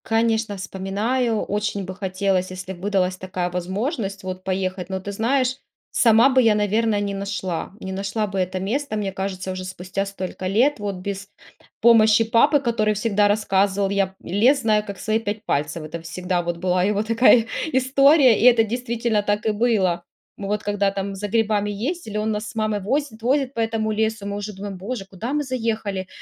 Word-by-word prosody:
Конечно, 225 Hz, -1 st, +1 dB
вспоминаю. 210 Hz, +5 st, -1 dB
Очень 205 Hz, -1 st, -2 dB
бы 185 Hz, -, -6 dB
хотелось, 190 Hz, -1 st, -1 dB
если 185 Hz, +1 st, -6 dB
б 175 Hz, -, -14 dB
выдалась 190 Hz, -2 st, 0 dB
такая 185 Hz, -1 st, -3 dB
возможность 195 Hz, -, -3 dB
вот 185 Hz, 0 st, -6 dB
поехать. 185 Hz, -1 st, -2 dB
Но 190 Hz, 0 st, -2 dB
ты 200 Hz, +2 st, -6 dB
знаешь, 255 Hz, +5 st, +1 dB, 0.3 s
сама 230 Hz, +2 st, +5 dB
бы 260 Hz, -1 st, +4 dB
я, 225 Hz, -3 st, +4 dB
наверно, 210 Hz, +1 st, +1 dB
не 200 Hz, -1 st, -2 dB
нашла. 195 Hz, -4 st, -3 dB
Не 190 Hz, -, -6 dB
нашла 200 Hz, +3 st, -2 dB
бы 195 Hz, -1 st, -3 dB
это 185 Hz, 0 st, -1 dB
место, 230 Hz, +6 st, -2 dB
мне 205 Hz, -2 st, -2 dB
кажется, 190 Hz, -1 st, -4 dB
уже 185 Hz, 0 st, -5 dB
спустя 185 Hz, +1 st, -4 dB
столько 185 Hz, -1 st, -5 dB
лет. 235 Hz, +8 st, +2 dB
Вот 205 Hz, -1 st, -3 dB
без 195 Hz, +2 st, -6 dB, 0.5 s
помощи 225 Hz, -1 st, +6 dB
папы, 235 Hz, +7 st, +4 dB
который 230 Hz, -5 st, 0 dB
всегда 205 Hz, -1 st, +2 dB
рассказывал: 200 Hz, -1 st, +1 dB
"Я 195 Hz, -1 st, 0 dB
лес, 240 Hz, +10 st, +3 dB
знаю, 215 Hz, -2 st, +2 dB
как 200 Hz, -2 st, -7 dB
свои 215 Hz, +2 st, 0 dB
пять 210 Hz, 0 st, -4 dB
пальцев". 150 Hz, +3 st, -1 dB
Это 160 Hz, +2 st, -7 dB
всегда 180 Hz, +2 st, -2 dB
вот 175 Hz, 0 st, -3 dB
была 180 Hz, +1 st, +1 dB
его 205 Hz, +2 st, +1 dB
такая 230 Hz, +1 st, +5 dB, 0.3 s
история 265 Hz, -1 st, +5 dB
и -, -, 0 dB
это 235 Hz, -2 st, +7 dB
действительно 235 Hz, -1 st, -1 dB
так 205 Hz, +1 st, -1 dB
и 220 Hz, -, +3 dB
было. 205 Hz, -6 st, +1 dB, 0.3 s
Вот 205 Hz, +1 st, -3 dB
когда 205 Hz, -1 st, +1 dB
там 195 Hz, 0 st, -4 dB
за 200 Hz, +2 st, -4 dB
грибами 210 Hz, -1 st, +1 dB
ездили, 220 Hz, -, -4 dB
он 215 Hz, +1 st, 0 dB
нас 210 Hz, 0 st, -3 dB
с -, -, -12 dB
мамой 215 Hz, -1 st, 0 dB
возит, 240 Hz, +2 st, -2 dB
возит 265 Hz, +2 st, +1 dB
по 230 Hz, -, -5 dB
этому 225 Hz, -1 st, 0 dB
лесу. 220 Hz, -1 st, -1 dB
Мы 200 Hz, 0 st, -3 dB
уже 205 Hz, +1 st, -5 dB
думаем: 195 Hz, 0 st, -7 dB
"Боже, 200 Hz, +2 st, -5 dB
куда 195 Hz, +7 st, -5 dB
мы 295 Hz, 0 st, 0 dB
заехали? 225 Hz, -7 st, -2 dB
205 Hz, 185 wpm, -22 LUFS, 190-225 Hz, 0.5 s, это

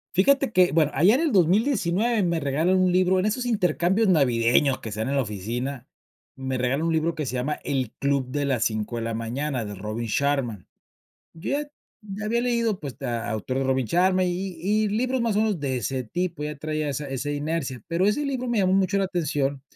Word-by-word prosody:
Fíjate 275 Hz, +5 st, +3 dB
que, 180 Hz, -1 st, +5 dB
bueno, 155 Hz, -2 st, +3 dB
allá 180 Hz, -, +5 dB
en -, -, +1 dB
el 315 Hz, -6 st, +1 dB
2019 205 Hz, -, +2 dB
me 170 Hz, -2 st, +1 dB
regalan 155 Hz, +7 st, +1 dB
un 185 Hz, -1 st, +3 dB
libro, 185 Hz, 0 st, +3 dB
en 185 Hz, -, 0 dB
esos 245 Hz, +4 st, -1 dB
intercambios 195 Hz, -1 st, +1 dB
navideños 130 Hz, -4 st, +3 dB
que 110 Hz, -, -6 dB
se 110 Hz, -, -3 dB
dan 110 Hz, -, -2 dB
en 140 Hz, -, 0 dB
la -, -, +3 dB
oficina, 120 Hz, +6 st, -5 dB, 0.5 s
me 130 Hz, -1 st, -3 dB
regalan 130 Hz, +6 st, 0 dB
un 165 Hz, -, +1 dB
libro 160 Hz, +1 st, 0 dB
que 155 Hz, -2 st, -3 dB
se 125 Hz, -, -4 dB
llama 130 Hz, +4 st, -1 dB
El 130 Hz, -5 st, -1 dB
club 140 Hz, -2 st, +1 dB
de 145 Hz, +2 st, -1 dB
las 130 Hz, -5 st, +1 dB
cinco 110 Hz, +1 st, -2 dB
de 115 Hz, -, -3 dB
la 115 Hz, 0 st, -3 dB
mañana, 125 Hz, +3 st, -3 dB
de 105 Hz, 0 st, -6 dB
Robin 105 Hz, +4 st, -4 dB
Sharma. 130 Hz, -6 st, -1 dB, 0.7 s
Yo 165 Hz, +12 st, -3 dB, 0.5 s
ya 210 Hz, 0 st, -6 dB
había 235 Hz, +2 st, +1 dB
leído, 235 Hz, -4 st, 0 dB
pues 140 Hz, -4 st, -8 dB
a 120 Hz, -3 st, -3 dB
autor 110 Hz, +4 st, -3 dB
de -, -, 0 dB
Robin 130 Hz, -1 st, +1 dB
Sharma 185 Hz, -, +2 dB
y 180 Hz, -, 0 dB, 0.3 s
y 210 Hz, +4 st, +1 dB
y 210 Hz, -, +1 dB
libros 250 Hz, +4 st, 0 dB
más 230 Hz, -3 st, 0 dB
o -, -, +3 dB
menos 215 Hz, -4 st, +1 dB
de 130 Hz, -3 st, -1 dB
ese 130 Hz, +3 st, -2 dB
tipo, 170 Hz, +3 st, -3 dB
ya 150 Hz, 0 st, -4 dB
traía 155 Hz, 0 st, -2 dB
esa 145 Hz, +1 st, -4 dB
esa 135 Hz, +2 st, -3 dB
inercia, 145 Hz, -3 st, -3 dB
pero 170 Hz, +3 st, +1 dB
ese 285 Hz, +8 st, +1 dB
libro 260 Hz, -2 st, -2 dB
me 240 Hz, -2 st, 0 dB
llamó 190 Hz, -1 st, +3 dB
mucho 195 Hz, 0 st, +2 dB
la 195 Hz, -, +2 dB
atención, 145 Hz, -7 st, -1 dB
155 Hz, 220 wpm, -25 LUFS, 130-190 Hz, 0.7 s, que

